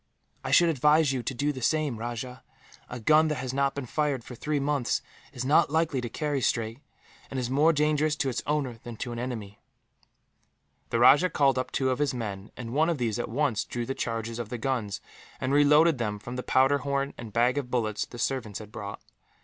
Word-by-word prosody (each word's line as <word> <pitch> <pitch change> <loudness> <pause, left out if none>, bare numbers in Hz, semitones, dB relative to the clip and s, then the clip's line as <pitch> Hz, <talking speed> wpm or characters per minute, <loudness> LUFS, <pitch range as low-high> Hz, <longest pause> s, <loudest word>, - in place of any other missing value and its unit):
"I - - -4
should 170 -1 +5
advise 150 0 +3
you 130 - -1
to 135 - -3
do 145 +4 0
the 130 - -7
same, 150 -1 +1
Rajah. 120 +2 -5 0.5
A 120 - -6
gun 155 +7 +4
that 150 - 0
has 130 -2 -4
not 140 0 +1
been 140 -2 -4
fired 145 -1 -1
for 125 - -10
three 150 +4 -2
months 140 -3 0 0.3
is 125 0 -5
not 145 +2 +4
likely 160 -3 +1
to 120 - -4
carry 145 +2 -2
straight, 115 0 -1 0.5
and 135 - -3
is 125 0 -3
more 150 +5 +5
dangerous 150 0 +1
to 140 -3 -1
its 125 - -2
owner 140 -6 -1
than 120 -2 -8
to 120 - -4
an 120 - -5
enemy." 110 -5 -5 1.3
The - - 0
rajah 145 +9 +6
called 135 -5 +2
up 130 - -3
two 130 -1 +1
of 130 - -2
his 145 -3 0
men, 105 -4 -5
and 120 -2 -6
one 155 +4 +3
of 170 - 0
these 120 -3 -1
at 120 - -3
once 125 -2 0
drew 120 -1 -4
the 135 - -2
charges 115 -1 -3
of 115 -3 -5
the 125 - -4
guns, 115 -5 -2 0.4
and 130 +1 -1
reloaded 150 +1 +5
them 105 -3 -1
from 120 +4 -8
the 125 - -3
powder 135 +3 +3
horn 140 0 -1
and 115 -2 -9
bag 125 +5 +2
of 130 -3 -6
bullets 110 -4 -1
the 120 - -10
servants 120 -5 -2
had 105 -1 -10
brought. 105 -3 -7
130 Hz, 220 wpm, -27 LUFS, 120-145 Hz, 1.3 s, rajah